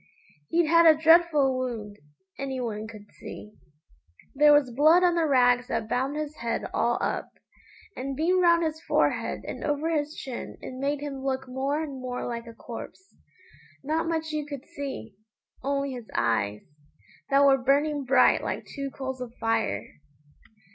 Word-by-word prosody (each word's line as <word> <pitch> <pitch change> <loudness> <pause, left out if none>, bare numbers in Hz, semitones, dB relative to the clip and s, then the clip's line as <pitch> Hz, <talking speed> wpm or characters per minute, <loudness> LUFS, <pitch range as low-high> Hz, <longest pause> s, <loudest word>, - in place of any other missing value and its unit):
He'd 340 0 +3
had 335 +1 +6
a 310 -1 +6
dreadful 320 -4 +5
wound, 225 -5 -4 0.4
any 270 -1 -3
one 220 -3 -4
could 215 -2 -12
see. 210 - -10 0.8
There 295 +2 +6
was 290 -4 +4
blood 310 +8 +5
on 355 -1 +4
the 335 -2 +1
rags 245 -2 +3
that 225 -1 -2
bound 265 +5 -1
his 305 0 -4
head 235 0 -2
all - - +1
up, - - -2 0.7
and 270 +1 -4
being 355 +5 +2
round 340 -1 +4
his 315 0 -2
forehead - - 0
and - - -6
over 295 +2 -1
his 300 -1 -1
chin 255 -3 -7
it - - -8
made 280 +2 -2
him 275 -2 -5
look 265 -1 -2
more 275 +4 -1
and 275 -4 -7
more 250 -1 -4
like 235 -1 -5
a 230 - -10
corpse. 255 +12 -10 0.7
Not 320 +4 -1
much 320 -1 -2
you 305 -1 -2
could 285 -3 -7
see, 270 - -7 0.5
only 275 +1 -1
his 245 -4 -8
eyes, 105 -2 0 0.7
that 280 0 +5
were 270 -1 +5
burning 285 +3 +1
bright 265 +1 +4
like - - -3
two 275 -1 -5
coals 265 -1 -6
of 245 -2 -6
fire. 225 -1 0
275 Hz, 165 wpm, -27 LUFS, 250-305 Hz, 0.8 s, had